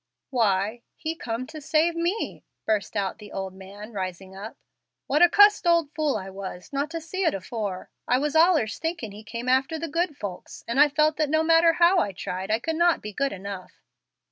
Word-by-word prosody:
"Why, 215 -2 +1
He 320 0 -3
come 240 -5 -4
to 310 +2 -9
save 315 +3 +2
me," 345 +6 -2 0.2
burst 215 -1 -1
out 195 0 -2
the 210 -1 -11
old 190 -1 -5
man, 200 +3 -11
rising 190 -1 -5
up. 205 +4 -8 0.5
"What 295 +4 +1
a 350 - +8
cussed 410 -1 +6
old 335 -4 +3
fool 305 -6 0
I 190 -2 -7
was, 190 +4 -8
not 280 +2 -1
to 330 0 -4
see 355 +4 -4
it 330 - +2
afore! 195 -1 -5 0.2
I 250 - +3
was 295 +3 -1
allers 320 -9 +4
thinkin' 325 - -3
He 210 +2 -11
came 235 +3 -6
after 265 +5 +2
the 330 +1 -4
good 335 -1 -1
folks, 195 -7 -7
and 235 +4 0
I 295 0 +7
felt 305 +1 +2
that 305 -2 +1
no 315 +1 +2
matter 330 +1 +5
how 350 +2 +5
I 200 - -1
tried 185 +2 -5
I 220 - +3
could 320 +7 -3
not 345 0 +3
be 210 0 -6
good 275 +6 0
enough. 195 -1 -8
265 Hz, 210 wpm, -25 LUFS, 200-325 Hz, 0.5 s, a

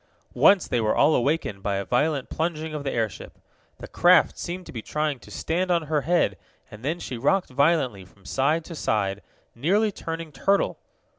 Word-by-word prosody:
Once 195 -3 +5
they 120 - 0
were 110 -1 +1
all 155 - +4
awakened 125 -7 0
by 100 0 -1
a 100 0 -2
violent 140 +3 0
plunging 160 -1 -3
of 150 -2 -4
the 135 - -2
airship. 110 -3 -4 0.4
The - - -9
craft 175 0 +4
seemed 180 +1 -6
to - - -10
be 115 - -6
trying 150 +1 -2
to - - -15
stand 180 +3 -2
on 170 -2 +2
her 155 -1 0
head, 160 - +1 0.3
and 105 +2 -12
then 160 +5 -2
she 125 -7 -6
rocked 180 +5 +1
violently 135 - +1
from 95 +1 -22
side 155 +5 0
to 170 - -8
side, 100 -9 -1 0.3
nearly 200 - +1
turning 165 -3 -6
turtle. 195 +8 +1
150 Hz, 190 wpm, -25 LUFS, 120-170 Hz, 0.4 s, Once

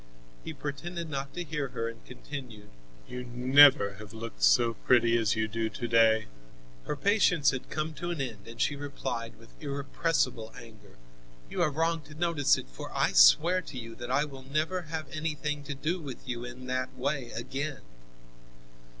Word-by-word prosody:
He - - -5
pretended 160 +3 -5
not 140 0 -3
to 175 - -2
hear 150 -3 -3
her 115 -2 -3
and 115 -1 -8
continued: 125 -5 -9 0.4
"You 125 0 -6
never 125 -4 +6
have 105 0 -10
looked 110 - -8
so 90 - +5
pretty 115 +1 +3
as 115 -3 +2
you 110 0 0
do 110 +1 -2
to 115 +3 -5
day." 115 -1 +4 0.6
Her - - -1
patience 180 -3 +3
had 130 -1 -6
come 155 +1 -2
to 175 +3 -5
an 170 -3 -3
end, 115 -7 -5
and 115 0 -10
she 145 - +1
replied 135 -5 -5
with 115 +1 -18
irrepressible 140 -5 -1
anger: 110 -4 -14 0.6
"You - - -1
are - - +4
wrong 165 +2 0
to 155 - -13
notice 160 -4 +3
it, - - -7
for - - -8
I - - +1
swear 155 - +6
to 150 - -9
you 115 -2 -7
that 120 +1 -8
I 140 +3 +2
will 135 -3 -10
never 155 +7 -1
have 160 -2 -4
anything 150 -2 -3
to 145 - -4
do 155 +6 -1
with 135 -3 -8
you 120 -1 -3
in 125 +1 -9
that 130 0 -3
way 130 -1 -2
again." 135 +4 -4
135 Hz, 180 wpm, -29 LUFS, 115-150 Hz, 0.6 s, never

